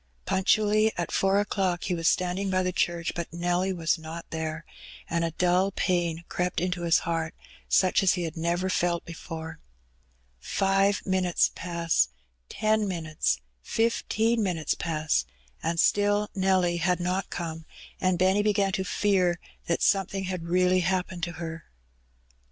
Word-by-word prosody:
Punctually 215 +3 +3
at 175 - -2
four 195 +1 +2
o'clock 190 -3 0
he 180 - -1
was 165 -1 0
standing 185 +2 +1
by 185 0 +1
the 185 - 0
church, 170 -2 0
but 170 -1 -4
Nelly 175 +2 0
was 165 -2 0
not 160 +1 -8
there, 160 0 -4 0.4
and 170 0 0
a 165 - +1
dull 180 +3 +2
pain 175 -3 -1
crept 180 0 -1
into 180 0 -2
his 170 -1 +4
heart, 165 -1 -2 0.3
such 185 -1 +4
as 190 -2 +4
he 180 - -2
had 165 -2 -4
never 170 +3 0
felt 175 -2 0
before. 165 -1 -7 0.8
Five 195 - +1
minutes 185 -2 +2
pass 170 - 0 0.2
— - - -45
ten 215 -1 +3
minutes 155 - -1
— - - -45 0.2
fifteen 230 0 +1
minutes 175 -6 0
pass, 155 -2 0 0.4
and 165 +1 -1
still 205 +2 +2
Nelly 185 -2 +2
had 180 +1 +1
not 180 +2 -1
come, 165 -2 -5 0.3
and 185 -1 +1
Benny 190 +3 +3
began 205 -2 +2
to 190 -1 -1
fear 185 -3 +1 0.3
that 170 - 0
something 195 -1 +1
had 185 -3 -4
really 180 +1 +3
happened 180 0 -1
to 175 - -6
her. 165 0 -6
180 Hz, 155 wpm, -27 LUFS, 165-190 Hz, 0.8 s, his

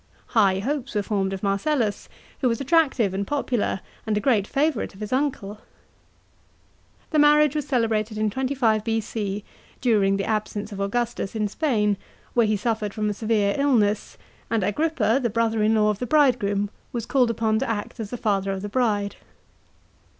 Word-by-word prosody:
High 195 -4 +3
hopes 270 +4 -3
were 205 - +1
formed 195 -1 -1
of 195 0 -5
Marcellus, 205 +3 0 0.3
who 260 - +2
was 230 - -1
attractive 275 - +2
and 195 +1 -2
popular 250 -9 -1 0.3
and 215 -1 +1
a - - +2
great 210 -3 +2
favourite 280 -7 0
of - - -14
his 210 +2 -4
uncle. 255 -7 -1 1.5
The 310 - +3
marriage 295 -1 +5
was 295 -2 -2
celebrated 225 -4 0
in 215 -1 0
25 255 -4 +1
B.C., 215 -2 -2 0.4
during 205 -5 +2
the 195 - -2
absence 215 -1 -2
of 200 - -7
Augustus 230 0 -2
in 215 -1 0
Spain, 210 -5 +1 0.4
where 235 -2 +3
he 210 0 +1
suffered 215 -1 -2
from 210 -1 0
a - - -2
severe 210 -1 +1
illness, 215 -7 +1 0.3
and 225 -3 +1
Agrippa, 245 - +1
the 240 - 0
brother 225 0 0
in 215 +1 +3
law 210 -1 +3
of 210 - -5
the 250 - -3
bridegroom, 215 -8 +2 0.2
was 235 -2 -3
called 255 -3 +2
upon 220 -1 +1
to - - -2
act 220 +1 -4
as 215 -3 -4
the 245 - -5
father 195 -3 0
of 190 0 -4
the 205 - -4
bride. 205 -4 0
220 Hz, 175 wpm, -24 LUFS, 205-250 Hz, 1.5 s, marriage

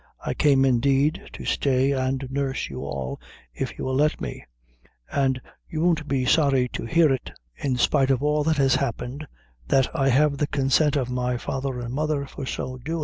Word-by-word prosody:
I - - -1
came, 135 -2 +4
indeed, 135 +4 +2
to - - -8
stay 135 0 +2
and 135 0 -1
nurse 135 -1 -2
you 65 - -6
all, 65 -1 -4 0.3
if - - -4
you - - -4
will 130 - -1
let 150 +3 +2
me; - - -6 0.7
an' 135 -2 +1 0.3
you 155 - -3
won't 165 -3 +1
be 135 -3 0
sorry 135 -3 +3
to - - -5
hear 160 +2 +4
it, 130 - -4 0.3
in 135 -3 -1
spite 130 +2 +2
of 135 0 +2
all 150 0 +2
that 160 -1 +2
has 135 -2 +4
happened, 135 +2 -2 0.4
that 135 -1 +2
I 135 -1 +2
have 140 +2 +3
the 150 - +1
consent 145 +1 +2
of 130 -3 -1
my 125 0 -1
father 135 0 -3
an' 120 -1 -5
mother 150 +1 -1
for 135 -1 -7
so 130 0 -4
doin'." 160 +6 -3
135 Hz, 195 wpm, -24 LUFS, 130-145 Hz, 0.7 s, came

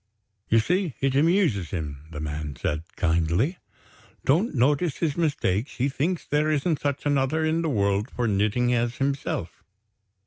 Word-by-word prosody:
"You 115 - +4
see 175 - +1
it 135 -1 +1
amuses 150 - +2
him," 75 -4 -5
the 75 -3 -7
man 75 -1 -4
said, 75 +5 -2
kindly. 85 - +1 0.7
"Don't 165 - +2
notice 145 +5 +2
his 155 -4 0
mistakes, 140 - 0
he 130 +3 +1
thinks 160 +6 -1
there 150 +1 +1
isn't 155 +1 +1
such 145 -1 -2
another 145 +2 +1
in 160 +1 +1
the 165 - 0
world 100 -1 +1
for 120 -1 -2
knitting 110 +4 +1
as 120 0 0
himself. 135 -10 -2
135 Hz, 150 wpm, -25 LUFS, 100-155 Hz, 0.7 s, You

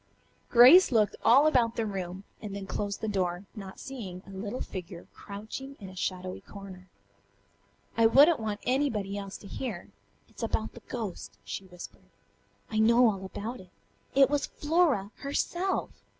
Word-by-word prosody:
Grace 260 +11 +8
looked 215 -3 +3
all 270 +6 +6
about 240 -7 +3
the 225 - -1
room 190 -2 -5 0.2
and 205 -2 -6
then 200 -1 -5
closed 200 0 -3
the 220 - -2
door, 185 -2 -1
not 195 -4 -9
seeing 195 -9 -7
a 195 - -12
little 205 +5 -5
figure 180 -2 -7
crouching 220 +7 -8
in 195 -3 -9
a 185 - -12
shadowy 185 0 -3
corner. 190 -2 -11 1.1
"I 230 -1 +5
wouldn't 285 +7 +6
want 210 -2 -3
anybody 235 -7 0
else 200 -1 -6
to 200 - -12
hear. 220 -5 -5 0.4
It's - - -13
about 220 -1 -2
the 235 - -12
ghost," 220 -7 -6
she 195 - -6
whispered. 180 -1 -12 0.6
"I 215 - 0
know 235 +1 +6
all 195 -2 -7
about 220 +6 -6
it. 185 - -14 0.5
It 275 -1 +7
was 290 0 0
Flora 295 - +1
herself! 350 +7 -1
215 Hz, 160 wpm, -29 LUFS, 195-250 Hz, 1.1 s, Grace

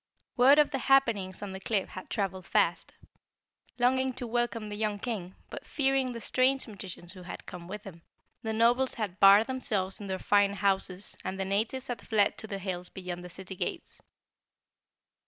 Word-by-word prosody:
Word 270 +3 +7
of 300 -1 +4
the 270 - -1
happenings 230 -9 +2
on 200 - -5
the 190 - -6
cliff 195 -1 -1
had 185 - -9
traveled 190 -3 -2
fast. - - +1 0.8
Longing 260 +1 +2
to 250 0 -5
welcome 240 -1 -1
the 210 -1 -5
young 210 -1 -1
King, 200 -5 -5 0.2
but - - -7
fearing 270 -2 +1
the 235 - -6
strange 260 +4 +2
magicians 185 -5 -8
who 185 - -11
had 175 - -8
come 175 -2 -9
with 210 +2 -7
him, 170 -4 -11 0.4
the 220 -2 -3
Nobles 240 +4 +3
had 205 -5 -4
barred 200 +3 +8
themselves 210 -7 -1
in 205 - -7
their 190 -1 -2
fine 200 +1 +3
houses 195 -1 0
and 190 +1 -4
the 190 - -1
natives 220 +7 -1
had 245 -3 -5
fled 210 -2 +2
to 220 - -6
the 200 -2 -4
hills 180 -2 -4
beyond 180 -2 -6
the 180 - -8
city 190 +2 -8
gates. - - -4
205 Hz, 185 wpm, -29 LUFS, 190-245 Hz, 0.8 s, barred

